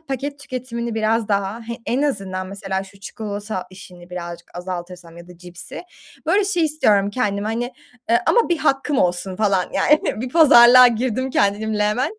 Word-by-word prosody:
paket 280 -1 -5
tüketimini 240 -4 -5
biraz 225 0 0
daha 200 +2 -1
He, 235 +1 -6
en 255 +4 0
azından 195 -9 -2
mesela 195 -1 -4
şu 195 +1 -18
çikolata 205 -2 -6
işini 180 -1 -14
birazcık 175 -1 -8
azaltırsam 175 -1 -7
ya 170 +1 -13
da 180 -1 -14
cipsi. 175 0 -9 0.4
Böyle 405 +1 +3
şey 355 -4 +1
istiyorum 210 -10 +2
kendime, 205 -3 -2
hani, 240 +3 -3 0.4
ııı, 235 - +5
ama 475 -4 +3
1 345 - +1
hakkım 275 -1 0
olsun 180 +1 0
falan, 200 -4 +1
yani 300 -7 +2
bir 255 - -3
pazarlığa 250 -5 +8
girdim 255 +2 -2
kendimle 210 0 0
hemen. 255 - -1
215 Hz, 165 wpm, -20 LUFS, 190-255 Hz, 0.4 s, pazarlığa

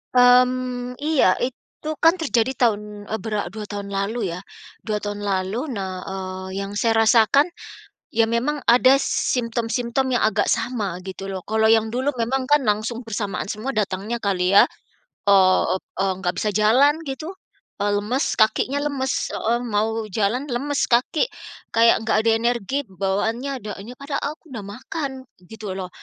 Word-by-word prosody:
Mmm, 250 0 +4
iya 305 -2 +2 0.2
itu 260 +4 -5
kan 330 +2 +7
terjadi 260 -4 +1
tahun, 215 -3 +3 0.3
eee, 220 - -1
bera 215 -2 -2
2 215 -1 -6
tahun 200 -1 -6
lalu 200 +1 -2
ya, - - -6 0.5
2 215 -2 -1
tahun 205 0 -4
lalu 190 +2 -1 0.2
nah, 195 -3 -3 0.2
eee, 190 0 -5
yang 195 0 -5
saya 225 0 +2
rasakan, 230 +8 +5 0.6
ya 225 0 +3
memang 250 +6 0
ada 255 +3 +6
symptom-symptom 240 0 -1
yang - - +1
agak 215 - +1
sama 225 -6 -1
gitu 190 +1 -6
loh 190 - -3
kalau 220 +1 +2
yang 225 -1 +4
dulu 260 +3 +1
memang 260 +3 0
kan 295 0 +6
langsung 215 +3 0
bersamaan 205 -4 -3
semua 215 +6 -4
datangnya 205 +3 -2
kali 185 -4 0
ya? - - +8 0.6
eee 190 -2 +5 0.3
eee, 190 0 +1
nggak 180 -1 0
bisa 215 - 0
jalan 230 +8 +5 0.2
gitu, 310 +7 -5 0.5
eee, 205 - +1
lemes 240 +8 0
kakinya 245 +5 +2
lemes, 270 -2 -1 0.2
heeh, 235 +2 0 0.2
mau 215 +2 +2 0.3
jalan 230 +7 +1
lemes 285 +4 0
kaki, 250 - +2 0.5
kayak 230 0 +6
nggak 220 - +2
ada 225 - +2
energi 235 +1 -1 0.2
bawaannya 220 +8 -1
da 210 -3 -6
nya 235 +5 -9
padahal 280 0 -4 0.2
aku 310 -6 -17
udah 225 - -5
makan, 275 +4 -4 0.4
gitu 215 -3 -6
loh, 185 -1 -5
225 Hz, 155 wpm, -22 LUFS, 205-255 Hz, 0.6 s, ya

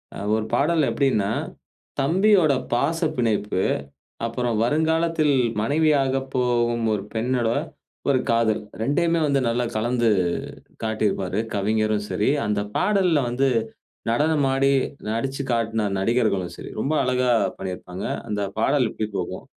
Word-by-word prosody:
அ - - -6 0.2
ஒரு 110 0 -1
பாடல்ல 150 +4 +2
எப்டினா, 115 -8 +1 0.7
தம்பியோட 175 +2 +4 0.2
பாச 145 +7 +1 0.2
பிணைப்பு, 105 -5 0 0.7
அப்புறம் 120 0 -1
வருங்காலத்தில் 160 +2 +2 0.3
மனைவியாக 140 +1 +2 0.2
போகும் 120 -2 +1
ஒரு 100 - -3
பெண்ணோட 120 0 0 0.6
ஒரு 135 -2 +4
காதல் 115 -2 +2 0.2
2யுமே 165 +6 +1
வந்து 140 -1 +2
நல்லா 120 +1 0
கலந்து 120 +1 +1 0.7
காட்டியிருப்பாரு. 105 -3 -1 0.2
கவிஞரும் 105 +1 0
சரி, 105 - +1 0.2
அந்த 105 -1 0 0.2
பாடல்ல 185 -8 +2
வந்து 125 +3 +1 0.6
நடனம் 145 +4 +2
ஆடி, 135 +1 +3 0.4
நடிச்சு 135 +5 -2
காட்ன 110 -2 0
நடிகர்களும் 100 -3 0
சரி. - - -9
ரொம்ப 140 - -1
அழகா 125 0 +1 0.3
பண்ணிருப்பாங்க. 90 0 -6 0.2
அந்த 105 -1 -2 0.2
பாடல் 130 +3 +2
இப்டி 110 - -3
போகும். - - -4
120 Hz, 115 wpm, -23 LUFS, 110-145 Hz, 0.7 s, தம்பியோட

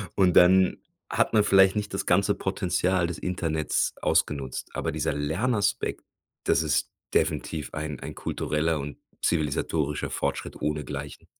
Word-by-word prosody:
und 95 -3 +3
dann 95 +1 +6 0.3
hat - - +1
man 105 -2 +5
vielleicht 95 -1 +5
nicht 105 -1 -3
das 95 - -2
ganze 95 +2 +3
Potenzial 90 -1 0
des 85 -2 -5
Internets 80 -4 -1
ausgenutzt. 70 -3 0
Aber - - -1
dieser 80 +1 -1
Lernaspekt, 100 - 0 0.4
das - - +2
ist - - 0 0.2
definitiv 80 -2 -1
ein 75 -1 -4
ein - - -7
kultureller 80 +1 -1
und 70 +1 -6 0.2
zivilisatorischer 75 -1 0
Fortschritt - - -3
ohnegleichen. 75 -2 -4
80 Hz, 130 wpm, -26 LUFS, 75-95 Hz, 0.4 s, dann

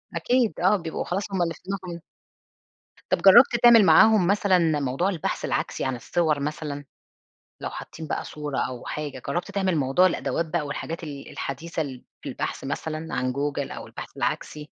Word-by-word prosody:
أكيد، 245 -6 +1
آه، 190 +4 +4
بيبقوا 165 -3 -4
خلاص 195 +3 -2
هُم 190 - -1
اللي 165 -1 0
في - - -17
دماغهم 185 -3 -5 1.1
طب - - +3
جربت 235 +6 +8
تعمل 235 -2 +8
معاهم 185 +3 +6
مثلًا 180 -6 +3
موضوع 140 +8 0
البحث 175 -6 -3
العكسي - - -2
عن 130 -1 -1
الصور 155 +4 0
مثلًا؟ 145 0 -4 0.8
لو - - -4
حاطين 160 -1 -8
بقى - - -3
صورة 150 -2 -5
أو 125 -1 -3
حاجة، 145 -4 -5
جربت 175 +3 -2
تعمل 190 -3 0
موضوع 140 +6 +3
الأدوات 170 -2 -1
بقى 155 -2 -2
والحاجات 160 +3 -5
ال 140 -2 -8
الحديثة 160 +4 -4 0.4
في - - -7
البحث، - - -4
مثلًا 160 0 -4
عن 130 0 -1
Google 140 0 -2
أو - - -8
البحث - - -10
العكسي؟ 150 0 -3
160 Hz, 165 wpm, -25 LUFS, 145-185 Hz, 1.1 s, جربت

